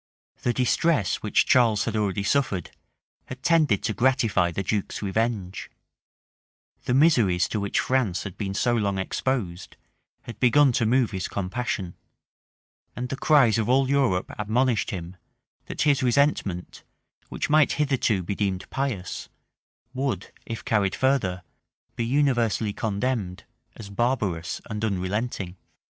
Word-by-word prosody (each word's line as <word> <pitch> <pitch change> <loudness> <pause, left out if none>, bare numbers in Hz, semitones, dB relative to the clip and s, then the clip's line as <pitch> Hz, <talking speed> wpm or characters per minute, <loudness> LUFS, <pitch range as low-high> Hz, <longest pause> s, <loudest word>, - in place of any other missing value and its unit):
The 120 - +1
distress 125 - +1
which - - +1
Charles 115 -5 +3
had 115 - -2
already 100 -2 0
suffered, 100 - 0 0.5
had 125 +1 -9
tended 155 - +3
to 110 - 0
gratify 115 -7 +2
the 90 +3 -3
duke's 105 +2 -2
revenge; 100 -2 -2 1.2
the 125 - +1
miseries 120 - +4
to 110 - -2
which 100 0 -1
France 125 -9 0
had 100 -4 -7
been 100 -2 -4
so 120 +3 +1
long 100 -4 0
exposed, 95 -2 -3 0.5
had 115 - -9
begun 135 +2 +5
to 115 -2 +1
move 125 0 +2
his 95 -2 -3
compassion; 95 -1 -3 1.0
and 125 +1 -4
the 135 - -2
cries 130 -6 +4
of 110 +1 -1
all 135 +1 +3
Europe 130 -10 +1
admonished 115 +2 +1
him, 90 -1 -6 0.5
that - - -2
his 145 -2 +3
resentment, 125 -8 0 0.5
which - - -3
might 155 -2 +4
hitherto 130 -9 +1
be 95 - -3
deemed 95 -2 -2
pious, 125 -10 -3 0.6
would, 130 -8 -3 0.2
if 115 -1 -6
carried 100 -3 +1
further, 105 -10 0 0.5
be 115 - -2
universally 120 -5 +1
condemned 105 -3 -2 0.3
as 100 -3 -10
barbarous 100 -7 -1
and 105 -1 -5
unrelenting. 100 -1 -2
110 Hz, 135 wpm, -25 LUFS, 95-130 Hz, 1.2 s, begun